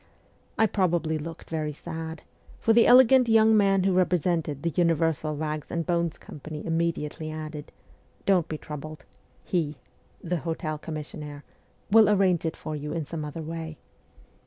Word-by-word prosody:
I 220 - +5
probably 170 -6 0
looked 165 +1 -8
very 155 -2 -2
sad, 160 0 -7 0.4
for 225 - +3
the 230 0 +6
elegant 255 0 +7
young 220 0 +6
man 195 -2 +4
who 190 0 +2
represented 170 -5 +1
the 170 - 0
Universal 165 -2 +1
Bags 155 0 -4
and 170 -1 -2
Bones 170 -2 0
Company 150 +1 -9
immediately 165 -2 -2
added: 155 -1 -7 0.3
' - - -35
Don't 180 -4 +3
be 155 - -4
troubled. 150 -1 -8 0.4
He 155 -5 -1 0.5
[the 175 +1 -1
hotel 160 -1 -3
commissionnaire] 150 -2 -7 0.5
will 220 -1 +7
arrange 185 -5 +3
it 160 - -4
for 155 - -5
you 150 0 -5
in 165 -2 -2
some 160 +1 -5
other 150 +2 -6
way.' 160 -1 -6
165 Hz, 155 wpm, -26 LUFS, 155-180 Hz, 0.5 s, elegant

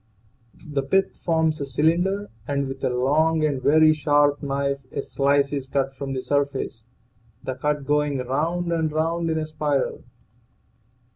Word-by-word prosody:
The 145 -3 -1
pith 190 +9 +1
forms 160 -2 0
a - - -1
cylinder, 175 +9 +1 0.2
and 140 -1 -1
with 135 0 -7
a - - +2
long 155 +6 +2
and 140 -4 -1
very 155 +3 +5
sharp 145 -1 +2
knife 140 -1 -1
a - - -3
slice 140 0 +1
is 140 -2 -3
cut 135 0 -1
from 135 0 -5
the 130 -1 -3
surface, 140 -5 -2 0.6
the 130 - -3
cut 145 +2 -2
going 150 -1 +1
round 160 +7 -1
and 160 -2 0
round 165 +2 0
in 160 - 0
a 155 - -1
spiral. 150 -3 -1
145 Hz, 155 wpm, -24 LUFS, 135-155 Hz, 0.6 s, very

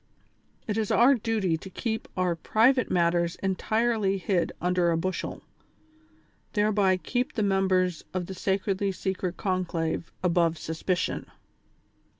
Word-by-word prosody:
It 215 0 -1
is 215 - -1
our 250 +4 +6
duty 220 -8 0
to 190 - -10
keep 220 +4 -3
our 180 -2 +1
private 235 +9 +3
matters 170 -1 +2
entirely 215 +1 +1
hid 185 -2 0
under 180 -1 +2
a 165 - +2
bushel, 185 +3 -3 1.1
thereby 205 -3 +3
keep 245 +6 -2
the 220 - 0
members 190 -3 +1
of 185 -1 -2
the 190 - -7
sacredly 195 +1 0
secret 185 -1 -3
conclave 170 -4 -2
above 170 -2 +2
suspicion." 165 +3 -2
190 Hz, 125 wpm, -27 LUFS, 175-210 Hz, 1.1 s, our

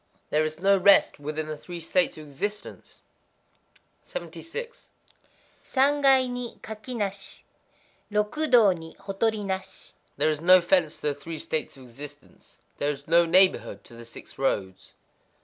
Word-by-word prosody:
_ - - -35
There 155 +1 +3
is 155 0 -4
no 195 +2 +4
rest 195 -5 +5
within 150 +2 -4
the 155 0 -5
Three 175 +3 -9
States 175 +1 0
of 155 - -9
Existence. 205 +9 -6 1.0
76.—Sangai 290 - -2
ni 245 -1 -6
kaki 220 +3 -7
nashi;—Rokudō 210 +3 -1
ni 165 0 -11
hotori 205 +2 -1
nashi. 190 -1 -5 0.2
There 155 - +2
is 150 0 -4
no 185 +2 +7
fence 170 -2 +2
to - - -18
the 150 -1 +1
Three 155 +3 -8
States 155 -2 -4
of 130 - -13
Existence;—there 145 +2 -9
is 145 +1 -5
no 170 +1 +4
neighborhood 185 +3 +3
to - - -16
the 115 0 -11
Six 115 - -13
Roads. 95 -8 -2
185 Hz, 135 wpm, -26 LUFS, 150-215 Hz, 1.0 s, no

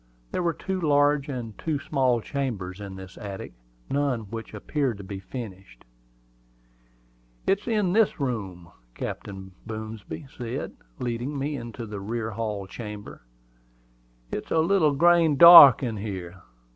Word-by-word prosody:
There - - -1
were 170 -2 0
two 190 -1 -4
large 145 -2 +3
and 120 -5 -5
two 155 -3 -1
small 130 -4 +1
chambers 105 -9 -4
in 100 -1 -7
this 95 -1 -11
attic, 100 -9 -7 0.3
none 140 -4 0
of 105 0 -13
which 115 0 -6
appeared 130 +1 -2
to 100 - -9
be 95 0 -7
furnished. 95 - -9 1.6
"It 195 - +2
is 210 - -19
in 210 -6 +1
this 220 -4 +3
room," 95 - -4
said - - -33
Captain 95 -1 -6 0.2
Boomsby, 110 - -7 0.7
leading 125 +4 -3
me 145 +2 -2
into 120 -2 -7
the 105 -2 -6
rear 110 +2 -3
hall 105 -2 -3
chamber. 105 0 -9 1.1
"It's - - -5
a - - +1
little 160 -2 +3
grain 165 -1 +4
dark 170 -5 +11
in 115 -4 -2
here." 95 -3 -6
115 Hz, 145 wpm, -26 LUFS, 100-145 Hz, 1.6 s, dark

